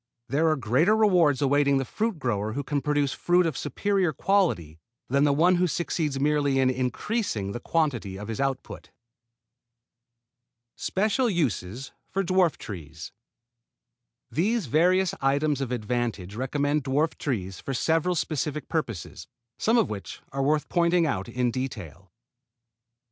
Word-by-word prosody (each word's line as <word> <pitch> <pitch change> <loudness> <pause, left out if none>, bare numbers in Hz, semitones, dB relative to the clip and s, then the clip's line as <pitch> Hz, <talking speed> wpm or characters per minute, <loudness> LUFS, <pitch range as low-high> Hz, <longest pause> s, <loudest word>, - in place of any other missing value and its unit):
There 155 +5 +2
are 155 - +3
greater 135 - +2
rewards 175 -10 +4
awaiting 140 0 +3
the 135 - -1
fruit 220 - -2
grower 110 -6 -2
who 140 +4 -3
can 145 +1 -1
produce 145 -2 +1
fruit 175 0 +2
of 160 -5 -1
superior 195 -1 0
quality 145 - 0 0.3
than 140 +3 +3
the 145 - +4
one 175 +5 +4
who 180 +1 +2
succeeds 155 -4 -1
merely 145 -1 +2
in 130 -1 +3
increasing 125 - -2
the 120 - -5
quantity 120 - -1
of 105 +1 -7
his 115 +3 -3
output. 135 -1 -3 1.9
SPECIAL 215 +6 0
USES 130 - -2 0.2
FOR 195 - -1
DWARF 185 -2 +2
TREES 80 -6 -8 1.2
These 210 +5 +1
various 180 +7 +3
items 140 +1 +1
of 130 -3 -3
advantage 115 -5 -2
recommend 145 +5 0
dwarf 145 +4 +1
fruit - - -22
trees 95 -9 -3
for 135 - -4
several 165 +6 +1
specific 150 -1 -2
purposes, - - -4 0.3
some 225 +2 +3
of 225 - +2
which 100 -2 -7
are 135 - -2
worth 150 +2 +1
pointing 170 0 +2
out 100 -11 -2
in 125 -1 0
detail. 100 - -6
145 Hz, 145 wpm, -26 LUFS, 120-170 Hz, 1.9 s, rewards